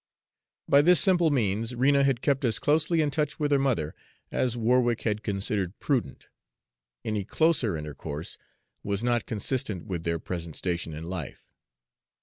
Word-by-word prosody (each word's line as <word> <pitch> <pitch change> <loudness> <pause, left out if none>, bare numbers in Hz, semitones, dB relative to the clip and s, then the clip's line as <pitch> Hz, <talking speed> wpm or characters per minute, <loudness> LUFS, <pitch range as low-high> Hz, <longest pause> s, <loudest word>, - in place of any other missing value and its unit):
By 140 - +6
this 175 +3 +6
simple 175 -4 +4
means 115 -3 0
Rena 140 +3 +3
had 135 -2 +1
kept 140 0 +1
as 115 -3 +2
closely 160 +2 +2
in 150 -2 0
touch 150 0 -1
with 145 -1 0
her 140 - +4
mother 115 - 0 0.4
as 120 -2 0
Warwick 120 0 +2
had 105 -2 -1
considered 100 -2 -1
prudent; 135 -5 -2 0.8
any 105 -2 -1
closer 130 - +1
intercourse 75 +1 -7 0.4
was 100 +2 -2
not 120 -1 +1
consistent 110 -3 -2
with 85 -4 -4
their 85 0 0
present 85 -1 -6
station 85 -3 -3
in 80 - -7
life. 85 -4 -6
115 Hz, 150 wpm, -27 LUFS, 95-140 Hz, 0.8 s, By